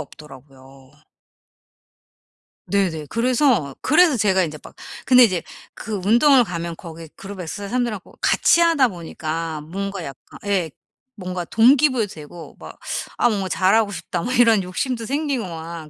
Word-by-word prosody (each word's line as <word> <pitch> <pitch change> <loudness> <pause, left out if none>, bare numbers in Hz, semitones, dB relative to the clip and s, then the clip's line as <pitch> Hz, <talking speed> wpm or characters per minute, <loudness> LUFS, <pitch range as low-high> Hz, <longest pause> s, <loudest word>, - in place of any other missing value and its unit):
없더라고요. 135 -2 -14 1.8
네네 170 -7 -1
그래서 235 - +1
그래서 315 0 +4
제가 190 -4 +2
인제 155 -2 -5
막 - - -13 0.3
근데 255 -1 +7
이제 185 -6 -2 0.3
그 215 -1 -6
운동을 250 +4 +5
가면 170 -2 -5
거기 165 -2 -10
그룹에 195 -3 -8
쓰 200 +5 -6
사람들하고 235 -4 -3
같이하다 330 -6 +4
보니까 165 -3 -5
뭔가 195 +3 -5
약간 135 -1 -12
예 185 -6 0 0.4
뭔가 180 -3 -5
동기 260 - +4
부여도 235 -5 -1
되고 160 +2 -11
막 - - -12 0.4
'아 240 - +3
뭔가 195 -4 -2
잘하고 205 +3 +2
싶다.' 170 0 -5
뭐 250 - -3
이런 230 -5 +4
욕심도 230 +6 -3
생기고 280 -3 -2
막 165 -2 -8
195 Hz, 300 characters per minute, -21 LUFS, 165-240 Hz, 1.8 s, 근데